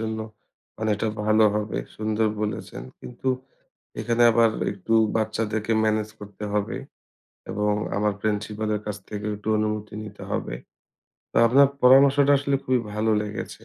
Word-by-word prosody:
জন্য 110 0 -3 0.6
অনেকটা 110 0 0 0.2
ভালো 110 +1 +4
হবে, 105 0 -2 0.2
সুন্দর 110 0 0
বলেছেন। 105 - -4 0.2
কিন্তু 125 +2 -5 0.7
এখানে 120 0 +2
আবার 115 0 +4 0.2
একটু 100 +3 -3 0.2
বাচ্চাদেরকে 110 0 -1
মেনেজ 110 0 0
করতে 105 0 -10
হবে। 105 -1 -1 0.7
এবং 105 +1 0 0.2
আমার 105 +1 +1
প্রিন্সিপালের 105 0 -1
কাছ 105 -1 -3
থেকে 105 0 -5
একটু 105 +1 -8
অনুমতি 105 -1 -2
নিতে 105 -1 -10
হবে। - - -2 0.8
তো - - -9
আপনার 135 +4 +6 0.2
পরামর্শটা 140 +2 +6
আসলে 140 0 0
খুবই 130 -1 +2
ভালো 110 +1 +1
লেগেছে। 105 0 -7
110 Hz, 130 wpm, -24 LUFS, 105-115 Hz, 0.8 s, আপনার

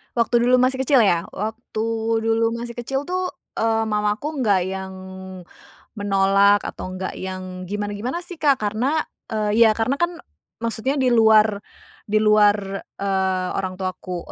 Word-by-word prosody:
Waktu 235 0 +2
dulu 250 +1 +5
masih 260 +1 +2
kecil 265 -1 +4
ya. 175 -5 +2
Waktu 220 +2 -4 0.4
dulu 225 0 +1
masih 235 0 -6
kecil 270 +3 -2
tuh, 365 +3 -2 0.2
eee, 225 0 +1
mamaku 210 +8 -1
nggak 200 -3 +3
yang 190 0 -5 1.1
menolak 200 0 +3
atau 185 - -6
nggak 185 0 -4
yang 185 -1 -6
gimana-gimana 205 - -3
sih, 355 -2 -10
Kak, 285 -4 +3
karena, 245 +9 0 0.3
eee, 215 +1 +2
ya - - +5
karena 225 +4 +1
kan 345 0 0 0.4
maksudnya 230 +5 -2
di 255 -2 +2
luar 220 -2 +5 0.5
di 210 - +1
luar, 210 -1 +5 0.4
eee, 190 -2 0
orang 185 -1 -3
tuaku, 185 -1 -5
215 Hz, 145 wpm, -22 LUFS, 195-245 Hz, 1.1 s, dulu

